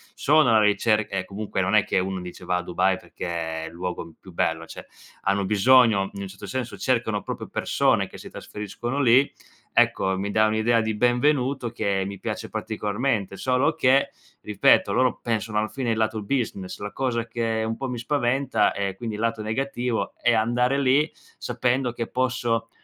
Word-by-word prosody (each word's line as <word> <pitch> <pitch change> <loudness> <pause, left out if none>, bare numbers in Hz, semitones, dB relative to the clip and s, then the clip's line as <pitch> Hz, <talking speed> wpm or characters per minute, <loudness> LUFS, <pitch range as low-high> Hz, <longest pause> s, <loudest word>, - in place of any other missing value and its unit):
sono 150 -3 +4
alla 110 -1 +5
ricerca 105 0 +2
e 95 - -2
comunque 100 0 -3
non 100 +3 0
è 105 - +5
che - - 0
uno 95 0 -2
dice 90 0 -9
va 90 0 +1
a 90 - -2
Dubai 90 +1 +1
perché 80 -2 -5
è - - -7
il 80 - -10
luogo 90 0 -4
m 85 - -14
più 95 - -14
bello, 80 0 0
cioè - - -10 0.4
hanno 100 0 +1
bisogno 110 -1 +4
in 100 - -6
un - - -5
certo 100 +2 -10
senso 120 +4 -4
cercano 115 -5 0
proprio - - -5
persone - - +1
che - - -12
si - - -10
trasferiscono 120 +6 -5
lì. 130 +2 +5 0.4
Ecco, 95 0 +3
mi 100 +1 -2
dà 110 +1 +4
un'idea 110 +2 +2
di 110 -1 -2
benvenuto 125 +1 +1
che 100 -4 -1
mi 100 -1 -6
piace - - -4
particolarmente, 105 -1 -2
solo 130 +1 +1
che, 135 +2 +3 0.3
ripeto, - - +3
loro 130 0 +2
pensano 110 -2 -2
alla 110 - 0
fine 130 -3 -3
il 110 - 0
lato 110 -1 0
business, 100 -5 -3
la 105 0 -5
cosa 120 -3 -1
che 115 -1 -1
un 115 - -2
po' 135 -1 -4
mi 125 - -4
spaventa 135 +1 +1
è 100 -1 -2
quindi 110 -1 -5
il 105 - -5
lato 115 -1 -1
negativo 120 +1 -2
è 120 - +4
andare 120 +4 +2
lì 140 +3 +3 0.3
sapendo 125 +1 0
che 115 -1 -4
posso 120 -3 -1
110 Hz, 190 wpm, -24 LUFS, 100-125 Hz, 0.4 s, alla